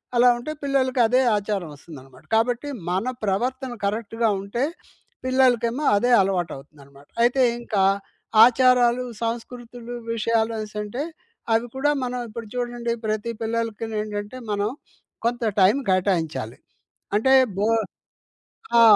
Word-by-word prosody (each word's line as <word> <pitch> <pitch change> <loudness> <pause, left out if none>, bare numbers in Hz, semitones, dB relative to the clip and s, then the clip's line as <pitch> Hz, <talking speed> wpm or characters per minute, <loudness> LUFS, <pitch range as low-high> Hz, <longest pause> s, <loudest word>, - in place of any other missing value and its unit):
అలా 240 +1 +6
ఉంటే 240 +6 -5
పిల్లలకి 265 -2 +1
అదే 250 +3 +3 0.2
ఆచారం 200 -4 -3
వస్తుందనమాట. 135 -3 -14
కాబట్టి 240 +5 +1 0.2
మన 185 +7 -1 0.2
ప్రవర్తన 250 +6 -1
కరెక్ట్‌గా 225 +2 0
ఉంటే, 200 +6 -2 0.6
పిల్లలకేమో 255 0 +2
అదే 245 +5 +2
అలవాటవుతుందనమాట. 145 -6 -5 0.2
అయితే 245 +3 +3 0.2
ఇంకా 210 -5 0 0.6
ఆచారాలు, 250 0 +4 0.2
సంస్కృతులు 240 +1 -5 0.2
విషయాలనేసంటే, 220 +1 -1 0.5
అవి 225 +1 +2
కూడా 285 +2 +2
మనం 250 0 -3
ఇప్పుడు 230 +1 -8
చూడండి 240 -1 -2
ప్రతి 215 +1 -1
పిల్లలకి 225 -1 -2
నేంటంటే 210 +2 -4
మనం 205 0 0 0.6
కొంత 240 +1 0 0.2
టైం 190 +4 +6
కేటాయించాలి. 165 - 0 0.6
అంటే 265 +5 +3 0.2
బో 205 +2 +1 1.1
ఆ! - - +8
230 Hz, 110 wpm, -23 LUFS, 200-245 Hz, 1.1 s, ఆ